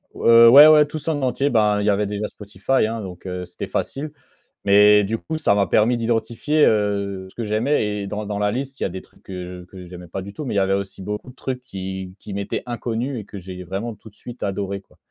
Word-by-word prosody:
Heu, 115 0 +7
ouais, 145 +5 +10
ouais 150 -1 +7
tout 155 +2 -6
ça 160 +3 -2
en 145 - -3
entier. 135 +2 0
Ben, 105 -3 +2
il - - -2
y - - +3
avait 105 +1 +2
déjà 105 +1 -3
Spotify, 105 +5 -1
hein, 115 0 -4
donc, 90 -2 -9
heu, 90 -1 -4
c'était 90 0 -7
facile. 145 +2 -3 0.6
Mais 105 +1 +6
du 110 +3 -2
coup, 160 - -5
ça 100 - +2
m'a 100 -1 +2
permis 115 +3 +3
d'identifier, 115 +6 +1
heu, 100 -2 0
ce - - -20
que 115 - -4
j'aimais. 110 +6 +1 0.2
Et 100 - -5
dans 105 +1 -4
dans 105 0 -4
la 105 0 +1
liste, 135 +4 -5
il - - 0
y - - +2
a - - -2
des 95 +1 -7
trucs - - -25
que 90 -1 -7
je - - -12
que 90 0 -11
j'aimais 90 0 -11
pas 95 +3 -5
du 100 +2 -9
tout, 150 - -7
mais 120 - -3
il - - -1
y - - +4
avait 95 0 +1
aussi 95 0 -3
beaucoup 105 +5 -5
de - - -16
trucs 125 -1 -5
qui 95 -5 -7
qui 105 - -10
m'étaient 100 0 -3
inconnus 120 +2 -3
et 105 - -9
que 105 - -10
j'ai 90 0 -8
vraiment 100 +6 -5
tout 110 - -15
de 105 - -21
suite 120 +3 -11
adoré, 100 0 -3
quoi. - - -27
105 Hz, 265 wpm, -22 LUFS, 95-120 Hz, 0.6 s, ouais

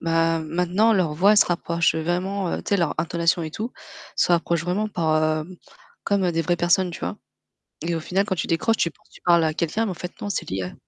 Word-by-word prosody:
Bah 165 0 +2
maintenant 180 +7 +1
leur 180 -7 +1
voix 195 +6 +5
elle - - +3
se - - +7
rapproche, 170 -1 +1
heu, 160 - -1
vraiment, 185 +3 -1
heu - - -3
tu - - -8
sais 200 - +3
leur 170 -5 0
intonation 170 +1 +1
et 160 - -4
tout, 220 +10 -5 0.4
se - - +2
rapproche 170 -1 +2
vraiment 185 +5 -1
par, 160 -5 +1 0.2
heu 180 +4 -12 0.5
comme 195 -3 +1
des 165 - 0
vraies 175 +1 +1
personnes, 175 +2 +2
tu - - -8
vois? - - -3 0.7
Et 170 - 0
au 165 - -1
final 185 +5 0
quand 190 - -1
tu 165 - -3
décroches 220 +7 +1
tu 170 - +1
penses - - -25
tu - - -17
parles 170 -1 +5
à 155 -1 +1
quelqu'un 170 +8 -1
mais 200 - -2
en - - -3
fait 180 +1 -7
non 205 - -3
c'est 200 - -3
l'IA. 95 -1 -3
175 Hz, 250 wpm, -23 LUFS, 165-190 Hz, 0.7 s, se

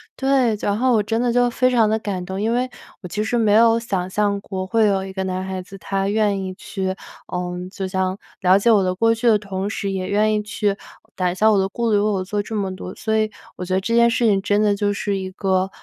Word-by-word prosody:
对， 265 -4 +2
然 205 0 0
后 255 +2 +2
我 215 -2 +3
真 225 +2 -1
的 245 -1 +1
就 245 0 +3
非 255 +1 +2
常 230 -4 +3
地 220 - +2
感 195 -4 -4
动， 190 +1 -4
因 220 +2 +1
为 250 +1 0 0.3
我 180 - -7
其 210 +4 -2
实 230 +3 -1
没 220 -3 +3
有 230 +1 +5
想 190 -6 -3
象 205 +1 0
过， 190 -2 -5
会 220 +3 +2
有 195 -1 0
一 190 - -8
个 190 0 -2
男 185 0 -2
孩 190 -1 -4
子， 195 +2 -12
他 195 0 -2
愿 205 -1 +1
意 185 0 -5
去 190 0 -4 0.4
嗯， 180 0 -4
就 190 0 -5
像 185 0 -1 0.2
了 185 0 +5
解 230 +4 +3
我 205 -3 +4
的 185 0 0
过 225 +4 +3
去 230 +2 -1
的 220 -2 +6
同 195 -1 -4
时， 200 -2 -3
也 185 -1 -3
愿 210 +2 +2
意 210 - +1
去 210 -1 -1 0.4
打 180 -1 0
消 215 +4 +3
我 210 - +3
的 190 - +1
顾 235 +2 -1
虑， 210 - +4
为 - - +2
我 205 -3 0
做 205 +2 -2
这 220 +2 -6
么 195 -3 -2
多。 185 0 -8
所 220 -1 -2
以 215 0 +2 0.3
我 - - -5
觉 185 - -3
得 - - +3
这 230 - -2
件 235 0 +5
事 235 +1 +1
情 200 -3 +3
真 205 +1 +1
的 210 -1 +3
就 205 0 0
是 200 0 -2
一 190 -1 -4
个， 190 -1 0
205 Hz, 290 characters per minute, -21 LUFS, 190-220 Hz, 0.4 s, 的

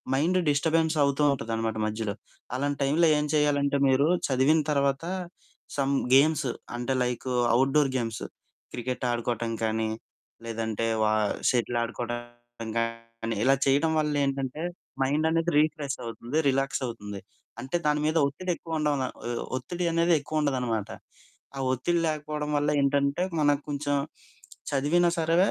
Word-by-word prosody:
Mind 175 +6 +2
disturbance 160 +2 +2
అవుతూ 140 +1 +1
ఉంటాదనమాట 115 -2 -2
మధ్యలో. 110 -1 -2 0.4
అలాంటి 145 +1 -1
టైంలో 160 +5 +3
ఏం 150 - 0
చేయాలంటే 145 -1 +2
మీరు 135 +3 +4 0.2
చదివిన 135 +5 +4
తర్వాత 140 +1 +1 0.7
సమ్ 140 0 +1 0.2
గేమ్స్ 150 -1 +4 0.3
అంటే 125 +2 -1
లైకు 125 +1 -3 0.2
అవుట్‌డోర్ 135 +3 +3
గేమ్స్ 115 -3 -3 0.5
క్రికెట్ 125 +1 -3
ఆడుకోవటం 120 -1 -2
కానీ, 110 0 0 0.6
లేదంటే 115 -1 -2 0.2
వా 110 0 +3 0.4
షటిల్ 120 -1 0
ఆడుకోవటం 120 -1 -6
గానీ 115 0 -3
ఇలా 135 +1 +5
చేయడం 145 +4 +3
వల్ల 150 -1 0
ఏంటంటే 135 +2 -3 0.4
మైండ్ 145 +4 +1
అనేది 165 +1 +1
రిఫ్రెష్ 150 -2 +1
అవుతుంది, 120 +5 -4
రిలాక్స్ 135 0 +1
అవుతుంది. 105 -4 -6 0.4
అంటే 135 +7 -2
దాని 150 0 +2
మీద 160 +1 +1
ఒత్తిడి 180 +6 -3
ఎక్కువ 165 -1 -5
ఉండం 150 -1 +1
న - - 0 0.2
ఒహ్, 120 -1 -2 0.2
ఒత్తిడి 175 +8 -4
అనేది 170 +1 +3
ఎక్కువ 155 +2 -2
ఉండదనమాట. 125 -7 -1 0.7
ఆ - - -4
ఒత్తిడి 170 +7 0
లేకపోవడం 150 -1 -2
వల్ల 145 +1 +1
ఏంటంటే 140 +4 +1 0.2
మనకు 145 -1 +3
కొంచెం 145 0 -1 0.8
చదివినా 155 +6 +3
సరే 165 +1 +2
140 Hz, 135 wpm, -27 LUFS, 120-150 Hz, 0.8 s, ఇలా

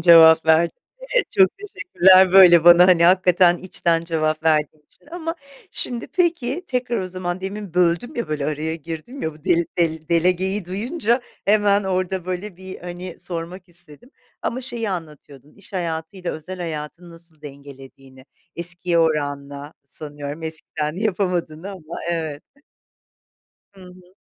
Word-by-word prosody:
cevap 160 -2 +7
verdin. 160 +1 +3 0.3
Evet, - - 0
çok 190 -1 +5
teşekkürler, 190 - +4
böyle 175 -4 +8
bana, 175 +1 +8
hani, 170 -2 +5
hakikaten 180 -1 +4
içten 170 -3 -1
cevap 155 -2 -1
verdiğin 155 -1 +1
için. 150 - -15
Ama, 330 -1 -4 0.4
şimdi, 240 -2 -2
peki, 340 -3 -1
tekrar 250 -2 -2
o 185 - -3
zaman 180 0 -4
demin 195 -1 -6
böldüm 180 - +1
ya, 235 -9 -3
böyle 150 -2 -2
araya 155 +1 -2
girdim 165 - -8
ya. 160 - -2
Bu 155 - -20
del 170 0 +2
dele 160 -2 -1
delegeyi 180 +3 +1
duyunca 235 - -1 0.2
hemen 205 -1 +3
orada 185 -1 -2
böyle, 185 0 -6
hani, 175 0 -8
sormak 175 +2 -7
istedim. 175 - -9 0.3
Ama 250 - -2
şeyi 235 -4 -3
anlatıyordun. 150 -5 -9
İş 200 - -16
hayatıyla 175 0 -4
özel 160 +4 -8
hayatını 165 +1 -6
nasıl 165 -2 -12
dengelediğini. 135 -2 -13 0.3
Eskiye 175 0 +1
oranla 145 -2 -2
sanıyorum 145 0 -6
eskiden 160 -1 -3
yapamadığını 185 -4 -2
ama 170 -4 -9
evet. 160 -3 -3 1.3
Hı 195 - -18
hı. 180 0 -17
175 Hz, 135 wpm, -21 LUFS, 160-190 Hz, 1.3 s, böyle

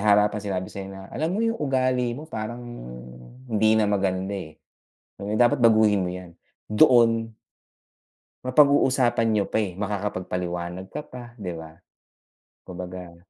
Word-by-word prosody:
harapan 105 0 +4
sinabi 95 -3 -3
sa 100 - -6
'yo 95 - -7
na, 95 0 -9
"Alam 160 +2 -1
mo - - -2
yung 230 0 0
ugali 130 -3 +1
mo 150 - -8
parang 120 -4 -6 0.8
hindi 110 -2 +3
na 110 - +3
maganda, 95 -1 0
eh, 80 -6 -6 0.8
dapat 120 +2 +4
baguhin 110 -4 +5
mo 90 - -2
'yan." 90 -1 -9 0.4
Doon 115 -2 +4 1.1
Mapag-uusapan 130 -4 +4
niyo 105 -2 +2
pa, - - 0
eh, 105 -4 -1
makakapagpaliwanag 90 -3 -3
ka 150 - -3
pa, 125 -5 -11
'di 90 -3 -4
ba? 80 -1 -10 1.0
Kumbaga, 90 -1 -8
105 Hz, 135 wpm, -25 LUFS, 95-120 Hz, 1.1 s, baguhin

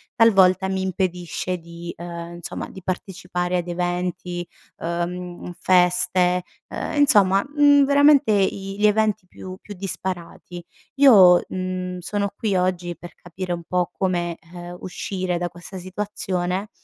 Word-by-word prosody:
talvolta 190 -4 +5
mi 190 0 -1
impedisce 180 -1 -2
di, 170 +1 -9
uhm, 170 0 -7
insomma 175 - -6
di 190 - -11
partecipare 180 -1 -3
ad 175 0 -3
eventi, 175 0 -3 0.3
uhm, 175 +1 -4
feste, 180 0 +3 0.3
uhm, - - -4
insomma, 200 -9 +4
mhmm, 290 -1 +6
veramente 285 -3 +5
i 195 0 0
gli 210 - +3
eventi 215 -2 +1
più 185 0 -9
più - - -14
disparati. 180 -2 -6 0.4
Io, 190 -10 +8
mhmm, 185 0 -4
sono 200 +2 -2
qui 210 -3 -1
oggi 180 -1 -1
per 175 +2 -11
capire 175 +1 -6
un 170 -1 -5
po' 180 +1 -1
come, 175 -3 -1 0.2
uhm, 175 0 -8
uscire 185 -1 -3
da 175 0 -2
questa 175 +2 -10
situazione, 185 0 -3
180 Hz, 130 wpm, -22 LUFS, 175-195 Hz, 0.4 s, Io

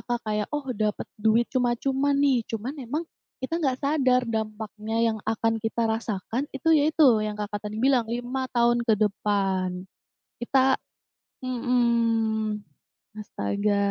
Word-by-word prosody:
Kak, 240 -1 0
kayak, 210 -1 -1
"Oh, 295 -2 -2
dapat 210 -1 -1 0.2
duit 220 +2 +4
cuma-cuma 265 +3 +1
nih". 275 -4 +3
Cuman 230 +6 -4
emang 295 +7 -3 0.4
kita 325 +6 -1
enggak 265 -4 0
sadar 265 -3 +3
dampaknya 220 -1 -4 0.2
yang 220 - -5
akan 225 0 +1
kita 225 +1 -1
rasakan, 220 +1 -2
itu 275 +4 -2
ya 295 -2 +4
itu 310 -1 +4 0.2
yang 210 -1 -3
Kakak 205 0 -4
tadi 215 - -6
bilang, 260 +1 +3
5 245 +2 -3
tahun 240 0 +3
ke 220 - +5
depan, 195 -3 0 0.6
kita 265 +2 +3 0.7
mhm, 230 -4 +1 0.6
astaga. 205 0 -1
230 Hz, 135 wpm, -26 LUFS, 215-260 Hz, 0.7 s, ke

